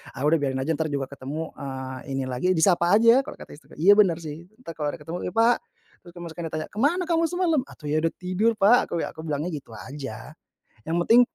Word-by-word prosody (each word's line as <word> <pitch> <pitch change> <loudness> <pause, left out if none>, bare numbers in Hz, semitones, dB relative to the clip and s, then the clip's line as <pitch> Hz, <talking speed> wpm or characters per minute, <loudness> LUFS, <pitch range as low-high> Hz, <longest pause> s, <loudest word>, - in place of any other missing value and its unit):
"Ah, 130 - -5
udah 155 +3 +4
biarin 135 -2 -1
aja, 155 - -1
ntar 160 0 -1
juga 140 -2 -2
ketemu, 145 +4 -5
eee, 130 -1 -6 0.2
ini 135 - -1
lagi, 125 +8 -1
disapa 175 +2 +4
aja." 230 +3 +6
Kalau 270 - -5
kata - - -12
istriku. 145 - -15
Iya, 175 +7 +5
benar, 170 -5 +3
sih, 160 +2 -8 0.2
ntar 165 - -7
kalau 155 -2 -3
ada - - -15
ketemu 165 +3 -5
"Ya, - - -4
Pak." 230 +2 +5 0.5
Terus 175 - -13
kamu 175 -1 -7
sekarang 165 0 -5
ditanya, 155 0 -4
"Ke 210 - -7
mana 330 +9 +2
kamu 335 -1 +1
semalam?" 350 -2 +1
"Atuh, 150 - -11
ya, 155 - +2
udah 165 +1 0
tidur, 190 +5 0
Pak" 215 +4 +4
aku 170 - -2
bila - - -4
aku 160 - -17
bilangnya 155 +4 -2
gitu 140 -7 -8
aja. 130 -1 -8 0.5
Yang 165 - -1
penting, 235 +2 +8
165 Hz, 240 wpm, -25 LUFS, 145-210 Hz, 0.5 s, penting